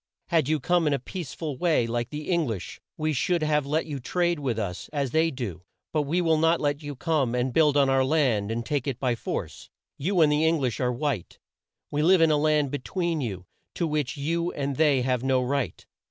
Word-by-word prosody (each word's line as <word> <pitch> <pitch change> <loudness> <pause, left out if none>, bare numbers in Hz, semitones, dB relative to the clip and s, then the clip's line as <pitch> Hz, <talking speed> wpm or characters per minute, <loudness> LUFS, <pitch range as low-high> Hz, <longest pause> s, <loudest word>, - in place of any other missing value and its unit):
"Had 160 -5 +2
you 155 -1 +2
come 175 +3 +2
in 145 - +2
a - - +2
peace 165 +3 -6
ful 150 -6 -5
way, 165 -9 +2
like 120 +1 -2
the 150 0 -6
Eng 170 -4 +2
lish, 110 -6 -5 0.2
we 155 0 0
should 170 +5 +1
have 150 -2 +1
let 155 +3 0
you 145 -3 -5
trade 175 +5 0
with 130 -6 -2
us 100 -4 -4
as 140 -4 -1
they 160 +1 +3
do, 120 - -5 0.3
but 155 - +2
we 175 +3 +2
will 160 -2 +2
not 165 +1 +3
let 145 0 -1
you 145 -1 -6
come 140 -4 0
and 125 +1 0
build 150 -1 +4
on 140 -1 +4
our 135 0 +3
land 130 -8 +1
and 115 +1 -3
take 145 +1 -1
it 130 -3 -2
by 125 -2 +1
force. 115 - -5 0.3
"You 175 +5 +1
and 150 -2 +5
the 150 +1 +2
Eng 160 +1 +3
lish 125 -5 -1
are 125 -1 +1
white. 125 - -3 0.5
We 150 - 0
live 180 +4 +5
in 165 -1 +5
a 150 - +3
land 150 -2 +2
be 145 - -2
tween 170 +2 -2
you, 95 -7 -4 0.3
to 170 - 0
which 150 -4 -2
you 170 +4 -1
and 140 -1 -2
they 145 -3 +3
have 125 -1 0
no 130 -1 +2
right. 130 +1 -2
145 Hz, 235 wpm, -26 LUFS, 125-160 Hz, 0.5 s, and